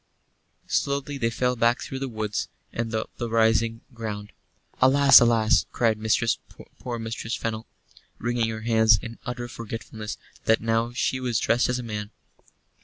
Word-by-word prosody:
Slowly 140 0 -1
they 115 -2 +1
fell 125 +2 0
back 120 +2 +2
through 135 - -6
the 135 0 -3
woods 110 -2 -3 0.3
and 115 -1 -3
up 110 - -3
the 120 - -3
rising 115 0 +2
ground. 105 -3 -6 0.5
"Alas, 140 +2 +8
alas!" 110 -6 +3
cried 115 -3 +1 0.8
poor 120 -2 -4
Mistress 115 0 -4
Fennel, 110 -1 -4 0.5
wringing 120 -1 0
her 110 -1 -5
hands 110 -2 +5
in 115 +1 -9
utter 120 0 -4
forgetfulness 115 -2 -7 0.3
that 110 - +4
now 115 +1 0
she 130 +1 -1
was 125 -3 -1
dressed 120 +3 +2
as 125 - 0
a 125 - -5
man. 105 -2 -5
115 Hz, 150 wpm, -25 LUFS, 110-120 Hz, 0.8 s, Alas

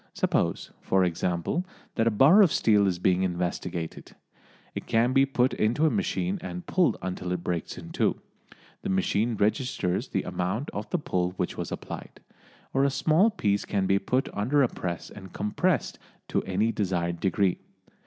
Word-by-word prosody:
Suppose, - - 0
for 95 0 +2
example, 90 - -1 0.3
that 115 - +1
a - - +6
bar 135 - +6
of 185 -6 +5
steel 105 -3 +3
is 90 -2 0
being 90 +1 +2
investigated; 90 -2 -3 0.6
it - - -6
can 120 +3 +2
be 135 0 +4
put 130 -1 +1
into 120 +9 +1
a 155 - +3
machine 195 -1 -1
and 180 -1 -6
pulled 180 -1 +2
until 90 -1 -4
it 90 -1 -2
breaks 85 -2 -3
in - - -9
two. - - 0 0.6
The - - -4
machine 100 +5 +1
registers 105 -3 0
the - - -1
amount 95 +10 -2
of 105 +1 -5
the - - +1
pull 90 - -1
which 90 -1 -3
was - - -5
applied. - - -7 0.5
Or 135 - +3
a 140 - +4
small 160 +9 +3
piece 100 - 0
can 100 -2 -1
be 95 +1 +3
put 130 +7 0
under 135 +8 +2
a - - +4
press 85 -6 -5
and 95 -3 -11
compressed 105 0 0 0.3
to - - +1
any 100 +4 +1
desired 90 -5 -1
degree. 95 +1 +1
100 Hz, 175 wpm, -27 LUFS, 90-135 Hz, 0.6 s, a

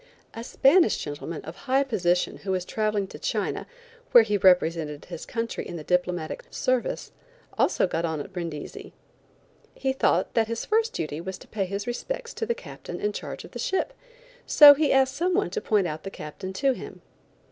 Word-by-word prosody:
A 230 - -6
Spanish 310 +9 +4
gentleman 150 +2 -6
of 160 +3 -8
high 265 +6 +1
position 180 -9 0
who 195 - -8
was 180 -1 -1
traveling 215 -1 0
to - - -10
China, - - -2 0.5
where 240 - +10
he 210 -2 0
represented 165 -6 +2
his - - -8
country 230 -1 -3
in - - -7
the 160 - -6
diplomatic 180 -1 -1
service, 255 -1 -1 0.4
also - - +2
got 165 -2 -2
on 160 -2 -1
at 165 +7 -8
Brindisi. 165 -5 -6 0.8
He 265 -1 -1
thought 265 - +1
that 225 -1 +2
his 230 0 -3
first 445 +1 +1
duty 155 0 -3
was 190 +2 -5
to - - -15
pay 200 -3 -2
his 200 +2 -4
respects 475 - -4
to 450 - -4
the 470 - 0
Captain - - -9
in 210 0 -1
charge - - -6
of - - -13
the - - -7
ship, 385 +6 -1 0.5
so 295 -2 +10
he 295 +1 +1
asked 265 0 +3
some 350 +4 +1
one 405 - +1
to 440 - -2
point 210 - +2 0.2
the 195 - -6
Captain 155 +1 -8
out 190 - -8
to 270 +6 +2
him. - - -10
210 Hz, 190 wpm, -26 LUFS, 175-270 Hz, 0.8 s, where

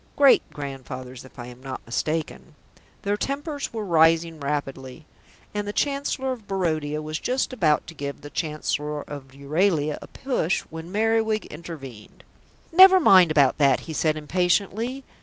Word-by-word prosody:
"Great 280 -2 +6
grandfathers, 130 -3 -7
if 130 - -17
I 120 - -7
am 125 +1 -12
not 130 -1 -6
mistaken." 120 - -3 0.5
Their 205 +1 0
tempers 285 +4 -3
were 220 -2 -4
rising 165 -1 +3
rapidly, 140 -2 -4 0.5
and 205 0 -3
the 205 - -3
Chancellor 275 -1 -1
of 230 -5 -7
Barodia 155 -5 -1
was 155 +1 -4
just 255 +1 -1
about 160 -11 +2
to 165 - -10
give 140 -2 -6
the 145 - -10
Chancellor 150 -1 -2
of 135 -2 -10
Euralia 150 +2 0
a - - -10
push 250 - -1
when 160 +2 -8
Merriwig 220 +1 +1
intervened. 140 -9 -10 0.5
"Never 375 +2 +9
mind 185 - +7
about 145 -3 +3
that," 140 -2 +4
he 160 - -7
said 155 0 +1
impatiently. 195 - 0
160 Hz, 150 wpm, -24 LUFS, 145-210 Hz, 0.5 s, Never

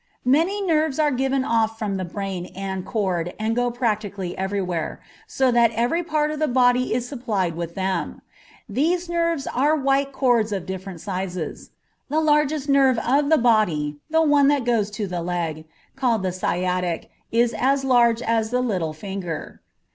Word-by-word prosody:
Many 335 +10 +2
nerves 310 -4 +1
are 300 -2 +3
given 265 +1 0
off 225 -2 +1
from 205 -4 -2
the 185 - -3
brain 185 0 -4
and 190 -1 -4
cord 180 -6 -2
and 220 +1 -1
go 245 0 +1
practically 210 -6 -2
everywhere, 190 -4 -2 0.3
so 265 -1 +1
that 235 -1 +5
every 240 +10 +1
part 305 -2 0
of 305 - -4
the 310 - +2
body 250 -1 +3
is 245 0 -2
supplied 215 - -2
with 170 0 -5
them. 190 0 -2 0.4
These 345 +5 0
nerves 335 -4 0
are 290 +5 +2
white 275 -1 +1
cords 240 -5 +2
of 195 -4 -3
different 190 -2 -6
sizes; 185 -3 -5 0.4
the 305 +3 +1
largest 300 -1 +2
nerve 270 -3 +4
of 280 +5 +1
the 315 - +5
body, 175 - +2
the 320 +1 +3
one 290 -2 +4
that 285 -4 +2
goes 225 -4 +1
to 210 0 -4
the 180 -2 -4
leg, 165 -3 -3 0.3
called 230 -6 +1
the 185 - 0
sciatic, 180 -1 -2 0.2
is 235 +1 +2
as 270 +1 +1
large 240 -2 +3
as 225 -1 +1
the 250 +1 0
little 185 -10 -1
finger. 185 -1 -6
230 Hz, 170 wpm, -23 LUFS, 190-275 Hz, 0.4 s, that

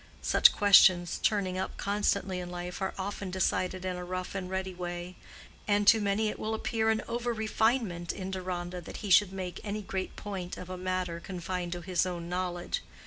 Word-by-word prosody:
Such - - +6
questions 185 -3 +6
turning 190 -3 +1
up 190 - -4
constantly 200 -2 0
in 175 -1 -5
life 180 +1 -6
are 190 - -2
often 195 0 -4
decided 185 0 0
in 185 -1 -2
a 180 - -5
rough 185 0 -4
and 190 -2 -4
ready 190 0 -3
way; 175 0 -5 0.5
and 205 0 +3
to 220 +1 +7
many 205 +2 +1
it - - -6
will 220 +1 -1
appear 220 0 0
an 220 0 +1
over 240 +1 -1
refinement 220 -5 0
in 190 0 -5
Deronda 180 -1 -4
that 160 - -8
he 200 - -2
should 195 +1 +6
make 185 -2 -5
any 210 0 -3
great 190 -1 -4
point 190 -3 -5
of 180 0 -8
a - - -3
matter 185 -2 -2
confined 180 0 -4
to 175 - -5
his 180 -1 +1
own 170 -2 -4
knowledge. 175 0 -2
185 Hz, 195 wpm, -30 LUFS, 180-205 Hz, 0.5 s, to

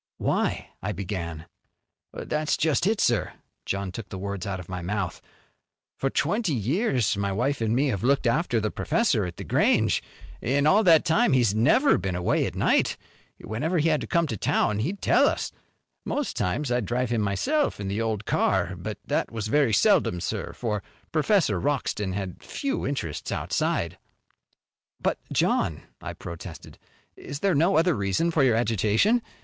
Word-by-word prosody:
"Why - - -1
" - - -45
I - - -2
began. 85 -4 -5 0.7
"That's 155 0 -1
just 160 +3 +1
it, 215 0 +1
sir." 120 -3 +1 0.3
John 100 -1 -2
took 105 +1 -8
the 95 - -6
words 100 -1 -4
out 95 -1 -3
of 90 - -9
my 90 -1 -5
mouth. 95 0 -3 0.7
"For 135 - -1
twenty 175 - 0
years 125 - +1
my 100 0 -1
wife 125 +7 -1
an' 110 0 +1
me 140 +3 +2
have 100 -6 -2
looked 135 +2 +2
after 120 -1 +1
the 110 -1 -1
professor 140 - +1
at 85 -1 -7
The - - -6
Grange. - - +2 0.4
In 140 +4 +1
all 200 +8 +5
that 165 -2 +6
time 185 - +3
he's 120 -6 +3
never 190 - +4
been 95 -2 -2
away 90 0 +1
at - - -7
night. - - +2 0.4
Whenever 150 - -2
he 160 +1 +3
had 155 -2 +1
to - - -5
come 170 -2 +2
to 120 - -3
town 105 +2 +1
he'd 175 - -3
tell - - +5
us. - - -1 0.5
Most 290 -2 -2
times 145 -4 -1
I'd 120 -5 0
drive 125 0 -1
him 115 -2 +1
myself 265 - 0
in 100 - -4
the 100 +3 -1
old 110 -2 -2
car. - - +1
But - - -6
that - - 0
was 110 -2 -4
very 140 -2 +3
seldom, 155 - +3
sir, - - -3
for 105 -4 -2 0.3
Professor 155 - +2
Wroxton 120 -9 -1
had 95 -2 -5
few 280 -1 -3
interests 125 - -4
outside." - - -1 1.0
"But, - - -1
John," 75 - +1 0.2
I - - -5
protested 85 -1 -9 0.4
"is 140 - -7
there 195 -2 +2
no 165 +6 +3
other 170 +2 +4
reason 100 - 0
for 155 -4 +2
your 125 -4 +4
agitation? 115 - +2
120 Hz, 175 wpm, -26 LUFS, 100-160 Hz, 1.0 s, that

